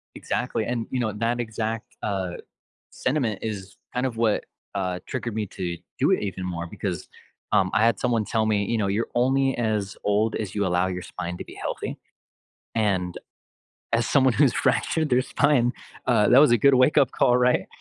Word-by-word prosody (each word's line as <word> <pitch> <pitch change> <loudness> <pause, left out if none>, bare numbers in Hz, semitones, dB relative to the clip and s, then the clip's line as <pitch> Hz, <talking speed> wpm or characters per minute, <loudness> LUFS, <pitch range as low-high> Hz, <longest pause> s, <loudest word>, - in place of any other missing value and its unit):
Exactly - - -2
and, 120 -2 -2
you 130 - -1
know, 115 -3 0
that 115 +3 -1
exact, 110 -1 -4
uh, 95 -4 -2 0.6
sentiment 125 -7 -1
is 100 -3 -5 0.2
kind 125 +1 0
of 120 -4 -3
what, 115 -2 +1 0.3
uh, 90 -2 -2
triggered 120 -4 -4
me 110 - -1
to 90 -2 -4 0.2
do - - +3
it - - +2
even 95 -2 -4
more, 85 -2 -3
because, 85 - -4 0.4
um, 95 - +3
I 110 +1 +4
had 115 -4 +2
someone 115 -3 +1
tell 110 0 0
me, 105 -2 +1
you 115 - 0
know, 105 -3 0
"You're 105 +4 -1
only 135 +2 +2
as 110 -4 -1
old 105 +2 +1
as 105 -3 -4
you 100 -1 +1
allow 90 0 +2
your 90 -1 -4
spine 90 0 -5
to - - -6
be - - -12
healthy." - - -4 0.8
and 95 -5 0 0.8
as 115 0 +2
someone 130 -2 +4
who's 105 - +4
fractured 160 -1 +1
their 125 - +4
spine, 130 -3 +2 0.3
uh, 115 -4 +4
that 125 - +6
was 150 - +6
a 120 - +6
good 140 +5 +5
wake 130 +4 +4
up 135 -3 +3
call, 125 - +3
right? 125 0 +2
110 Hz, 190 wpm, -25 LUFS, 100-125 Hz, 0.8 s, that